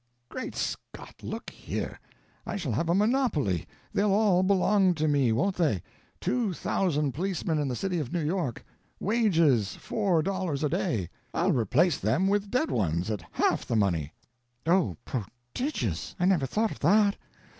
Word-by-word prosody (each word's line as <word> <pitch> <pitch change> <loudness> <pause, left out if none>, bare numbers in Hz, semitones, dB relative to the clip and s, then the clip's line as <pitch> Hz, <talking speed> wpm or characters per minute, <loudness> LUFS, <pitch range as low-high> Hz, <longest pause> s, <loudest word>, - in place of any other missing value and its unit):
"Great 255 - -5
Scott, - - -5
look - - -6
here. - - -5 0.4
I - - -4
shall 175 -10 -2
have 150 +10 -1
a 170 - +3
monopoly; 205 - +1 0.3
they'll 205 +1 +2
all 200 -3 +4
belong 190 -1 +3
to 155 0 0
me, 140 -5 +3
won't 185 - +1
they? 145 - +1 0.4
Two 230 -7 0
thousand 150 -5 0
policemen 170 0 -1
in 145 - 0
the 125 - -2
city 180 +4 -1
of 140 -5 -4
New 175 -2 -1
York. 160 - -2 0.3
Wages, 165 - +2
four 190 -7 0
dollars 185 -6 -2
a 150 - +2
day. 100 -9 -1 0.3
I'll 180 +3 +2
replace 140 - +2
them 190 +2 +1
with 200 0 +1
dead 255 +8 0
ones 90 -1 0
at 105 -4 -3
half - - +1
the - - 0
money." 85 -8 +1 0.5
"Oh, 165 - +2
prodigious! 120 - -4
I 180 - +2
never 180 -8 +3
thought 220 - 0
of - - -8
that. 200 +5 +4
170 Hz, 160 wpm, -28 LUFS, 125-195 Hz, 0.5 s, all